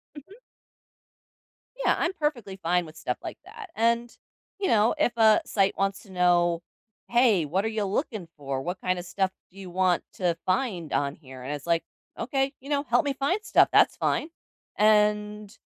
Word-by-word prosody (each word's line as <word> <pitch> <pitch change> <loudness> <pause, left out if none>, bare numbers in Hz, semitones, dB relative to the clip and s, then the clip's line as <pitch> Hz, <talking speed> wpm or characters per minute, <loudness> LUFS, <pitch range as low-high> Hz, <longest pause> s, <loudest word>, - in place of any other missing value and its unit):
Mhm. 295 +6 -12 1.5
Yeah, - - +4
I'm 345 - 0
perfectly 250 - -2
fine 175 +1 +1
with 155 0 -13
stuff 125 -5 -3
like - - -7
that. 415 +1 -11
And, 235 +1 +1 0.4
you 395 - -1
know, 220 0 +3
if 290 -5 +2
a 220 -2 +6
site 195 -2 +1
wants 195 0 -1
to 200 - -17
know, 175 -1 +2 0.5
"Hey, 235 -8 +4
what 180 +7 -1
are 220 - +1
ya 220 -2 -2
looking 205 - -2
for? 135 -2 -4
What 180 +3 -4
kinda 185 -1 -1
stuff 190 +2 -1 0.2
do 195 - -17
you 190 -2 -8
want 180 -1 +1
to 175 -3 0
find 185 - -1
on 140 0 0
here?" 130 -4 -12
And 130 +3 -5
it's 145 +1 -8
like, 170 -1 +1 0.3
"Okay, 270 +2 -1
you 275 - -12
know, 285 -1 +1
help 245 0 +2
me 285 - 0
find 285 +10 0
stuff," - - +5
that's - - +5
fine. 310 - -1 0.5
And, 210 0 +2
200 Hz, 180 wpm, -26 LUFS, 175-240 Hz, 1.5 s, a